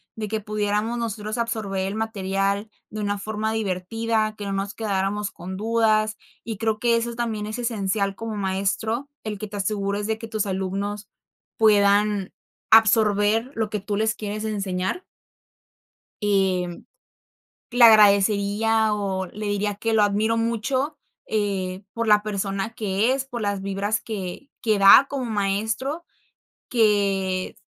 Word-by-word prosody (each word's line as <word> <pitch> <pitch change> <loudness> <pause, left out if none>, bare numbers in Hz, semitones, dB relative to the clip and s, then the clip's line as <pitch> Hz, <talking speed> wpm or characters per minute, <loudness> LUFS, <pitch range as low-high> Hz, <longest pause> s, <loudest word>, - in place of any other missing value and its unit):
de 215 -1 -4
que 220 +1 -2
pudiéramos 210 +2 -1
nosotros 215 -1 -3
absorber 210 -5 -2
el 195 - -4
material 200 -1 -1 0.2
de 215 - -5
una 205 0 -1
forma 215 +2 -3
divertida, 215 +2 -1
que 205 - -6
no 200 - -3
nos 195 +1 -2
quedáramos 205 -1 -1
con 185 +2 -7
dudas. 215 0 +1 0.3
Y 225 -2 -5
creo 220 0 0
que 235 0 +3
eso 235 0 -3
también 225 -3 -2
es 215 - -4
esencial 200 -4 -1
como 225 +1 -5
maestro, 205 +6 -1
el 210 -2 -5
que 215 - -5
te 205 0 -7
asegures 200 0 -1
de 220 0 -1
que 225 - -7
tus 215 -2 -2
alumnos 195 +2 -3 0.5
puedan 205 -2 +3 0.4
absorber 220 +1 +4
lo 220 -2 -1
que 210 - -1
tú 200 +1 -3
les 220 +1 +1
quieres 210 0 -5
enseñar. 195 - -2 1.2
Y 195 -3 +2 1.1
le 245 0 +4
agradecería 210 0 +5
o 195 -2 -2
le 210 +4 -6
diría 205 0 -1
que 225 +2 -1
lo 215 -1 +4
admiro 210 +3 +1
mucho, 255 +6 -1 0.3
eh, 195 -3 -2
por 230 0 -2
la 210 -1 +5
persona 200 0 -2
que 215 +1 +1
es, 270 0 -2
por 245 -3 -6
las 205 -2 -1
vibras 200 +3 -1
que 205 +4 -6
que 215 -3 +2
da 200 +7 +8
como 275 -2 -3
maestro, 220 - -1 0.7
que 200 -5 +1
210 Hz, 145 wpm, -24 LUFS, 200-225 Hz, 1.2 s, da